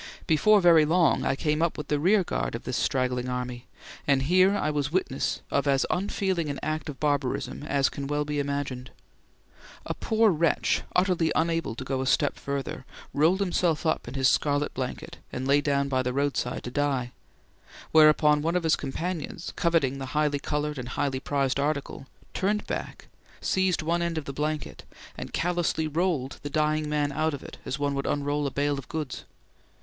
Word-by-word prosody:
Before 210 +7 +5
very 170 -3 +7
long 165 +2 +3
I - - +1
came 150 +2 0
up 170 -1 +1
with 150 - -5
the 150 - +1
rearguard 185 - +1
of 115 - -6
this 125 - -3
straggling 125 -1 0
army, 125 -1 -4 0.4
and 135 -2 +3
here 185 +6 +4
I 155 - 0
was 145 -1 -1
witness 165 -7 -1
of 140 +1 +1
as 135 -1 +3
unfeeling 185 -3 -1
an 140 - -3
act 155 0 -2
of 140 - -7
barbarism 145 -3 -1
as 140 -2 +1
can 140 -1 -5
well 150 +1 0
be 150 0 -2
imagined. 140 -2 -3 1.0
A - - -2
poor 220 -1 +2
wretch, 165 -1 +1
utterly 180 -3 +2
unable 165 -8 0
to 130 - -6
go 130 0 -2
a 130 - -2
step 145 +2 +2
further, 140 -1 -4 0.3
rolled 165 +7 +3
himself 175 -4 +1
up 160 - 0
in 120 - -7
his 135 -1 +3
scarlet 145 +1 +1
blanket 130 -1 -5
and 130 +1 -4
lay 140 +1 +4
down 140 -1 +1
by 130 -2 +1
the 125 0 -2
roadside 140 -2 -1
to 125 - -5
die; 135 -3 0 0.8
whereupon 150 -1 +6
one 165 +3 0
of 180 - +1
his 160 -1 +4
companions, 165 +4 -4
coveting 150 -6 +1
the 135 - -5
highly 150 -2 +2
coloured 150 0 -2
and 125 0 -6
highly 135 +1 -1
prized 140 -1 0
article, 140 -2 -2 0.3
turned 210 +2 0
back, - - -5 0.3
seized 190 -4 +1
one 170 +2 0
end 170 -1 -1
of 155 - -3
the 140 - -5
blanket, 150 +1 -3 0.3
and - - -7
callously 175 -2 0
rolled 155 -4 -1
the 145 - -5
dying 155 +1 0
man 145 -1 0
out 155 +1 0
of 140 - -10
it - - -10
as 135 - -2
one 145 -1 0
would 140 0 -2
unroll 145 0 0
a - - -4
bale 145 0 0
of 125 - -11
goods. 155 -5 -4
145 Hz, 185 wpm, -27 LUFS, 140-165 Hz, 1.0 s, very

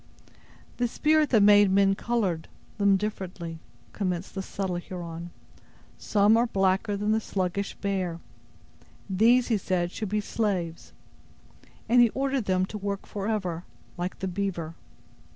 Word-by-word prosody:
"The 245 - +1
Spirit 305 +4 +2
that 220 -5 +5
made 205 -1 +7
men 195 0 +4
colored 195 -7 -1 0.3
them 200 -1 +4
differently," 185 -5 -5 0.3
commenced 185 -2 -3
the 195 - -3
subtle 190 -1 -3
Huron. 170 -1 -7 0.7
"Some 210 +1 +4
are 235 +1 +3
blacker 195 0 +1
than 210 +1 0
the 220 - +3
sluggish 195 0 -2
bear. 185 -4 -2 0.9
These 230 +6 +4
He 225 - +3
said 175 -2 -1
should 215 0 -4
be 210 +1 0
slaves; 195 -6 -2 1.0
and 240 +2 +6
He 240 - +6
ordered 270 -3 0
them 185 -1 +2
to 210 +2 -7
work 200 0 -3
forever, 195 -5 -3 0.3
like 180 +1 -4
the 190 - -3
beaver. 180 -4 -3
195 Hz, 135 wpm, -27 LUFS, 180-215 Hz, 1.0 s, made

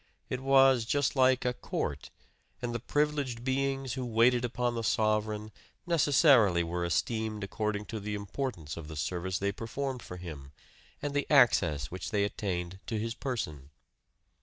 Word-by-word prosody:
It 125 - -1
was 135 -2 +5
just 145 +3 +1
like 130 -1 +4
a 125 - +1
court; 70 - -4 0.5
and 120 -1 -3
the 120 - -2
privileged 145 -2 -1
beings 135 -1 -1
who 130 - -3
waited 120 +1 +3
upon 120 0 -1
the 115 - -2
sovereign 110 0 0 0.3
necessarily 140 - +5
were 85 +1 -2
esteemed 110 +4 -1
according 105 +1 -2
to 110 - -2
the 105 +1 -4
importance 100 - -4
of 80 -2 -7
the 80 - -8
service 90 +5 -2
they 100 +1 0
performed 130 +4 -4
for 90 - -8
him 75 -6 -9 0.5
and 145 -1 -2
the 145 0 -1
access 85 - +4
which 90 0 -5
they 105 -3 +1
attained 95 -3 -3
to 110 - -2
his 115 +2 -2
person. 80 - -4
110 Hz, 160 wpm, -30 LUFS, 95-130 Hz, 0.5 s, was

